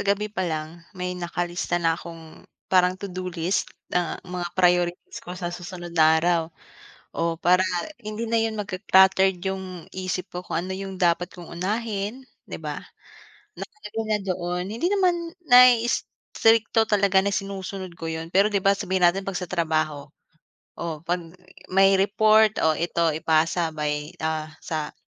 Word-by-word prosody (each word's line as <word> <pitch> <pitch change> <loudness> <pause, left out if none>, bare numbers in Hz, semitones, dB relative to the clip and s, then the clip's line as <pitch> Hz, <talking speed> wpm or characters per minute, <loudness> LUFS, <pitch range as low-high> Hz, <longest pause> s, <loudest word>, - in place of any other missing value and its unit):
gabi 205 +1 0
pa 190 - -3
lang 160 -1 -3 0.2
may 180 0 -3
nakalista 175 0 -2
na 165 -1 +2
akong, 165 -2 -12 0.2
parang 185 0 +4
to 195 0 -7
do 185 0 -4
list 175 +2 -1 0.2
ng 180 -1 0
mga 180 -1 -4
priorities 175 -1 +1
ko 180 - -8
sa 175 -1 -4
susunod 175 0 -8
na 160 -1 +5
araw, 170 +1 +2 0.7
o 165 0 -1
para 180 +2 +3 0.4
hindi 215 +1 -5
na 230 0 +1
'yun 225 -1 -1
magka-cluttered 190 -1 +3
'yung 190 -2 -4
isip 185 0 -4
ko 180 - -4
kung 165 - -2
ano 190 - -4
'yung 195 0 -6
dapat 175 -1 +2
kong 175 -2 -11
unahin, 210 +5 -3 0.3
'di - - -5
ba, - - -4 0.8
na - - -5 0.3
kung 220 -1 -3
nandoon, 180 -3 -2
hindi 230 - -1
naman 355 -4 +1 0.2
na-iisrikto 230 -3 +4
talaga 200 -2 +4
na 200 - 0
sinusunod 195 -2 -5
ko 165 -1 -5
'yun, 160 0 -5
pero 200 +2 +5
'di 205 - +2
ba 195 +1 +4
sabihin 190 -3 +1
natin 190 +3 +2
'pag 195 -1 -3
sa 180 - -5
trabaho, 155 -4 -1 0.7
o 160 -2 -4
'pag 175 +1 -1 0.5
may 195 +1 +4
report, 215 +2 +4
o 155 -1 +2
ito 170 -1 +1
ipasa 160 +1 +1
by, 150 +1 -3
ah, 155 0 -2
sa 155 -2 -4
180 Hz, 155 wpm, -24 LUFS, 170-200 Hz, 0.8 s, na